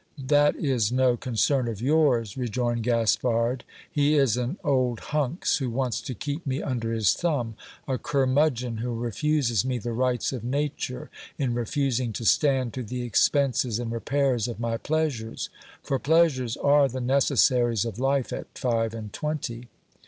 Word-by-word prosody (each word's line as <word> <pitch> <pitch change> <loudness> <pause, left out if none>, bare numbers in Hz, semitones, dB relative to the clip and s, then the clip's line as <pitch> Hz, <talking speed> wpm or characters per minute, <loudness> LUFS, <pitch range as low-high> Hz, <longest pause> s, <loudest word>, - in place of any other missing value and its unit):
That 145 +2 +3
is 125 -7 0
no 130 -1 +3
concern 125 +2 0
of 110 -4 -4
yours, 130 -5 +2
rejoined 120 -1 -1
Gaspard; 115 +1 +1 0.3
he 145 +1 +2
is 135 -6 +3
an 125 +8 -2
old 125 -4 +1
hunks, 150 +2 +1
who 135 -5 -2
wants 125 0 -1
to 130 - -6
keep 145 +6 -4
me 135 -1 -2
under 115 -4 -2
his 110 -5 +3
thumb; 140 -10 -1 0.3
a 130 -3 -1
curmudgeon 130 -4 +1
who 120 +1 -3
refuses 120 -1 0
me 130 -1 -1
the 120 0 -4
rights 125 +1 0
of 125 - -5
nature, 135 0 -3 0.3
in 130 -4 0
refus 125 +2 0
ing 120 -3 -2
to 115 - -5
stand 130 -2 +2
to 130 - -4
the 125 +2 -4
expenses 125 0 +2
and 120 -1 -4
repairs 125 0 0
of 120 -2 -6
my 115 -1 -1
pleasures; 140 -6 -2 0.3
for 135 - -1
pleasures 140 -6 +2
are 145 0 +4
the 130 0 -5
necessaries 125 -3 +2
of 115 -1 -5
life 135 0 0
at - - -7
five 115 -2 0
and 105 -3 -7
twenty. 130 -6 -4
125 Hz, 160 wpm, -26 LUFS, 115-140 Hz, 0.3 s, are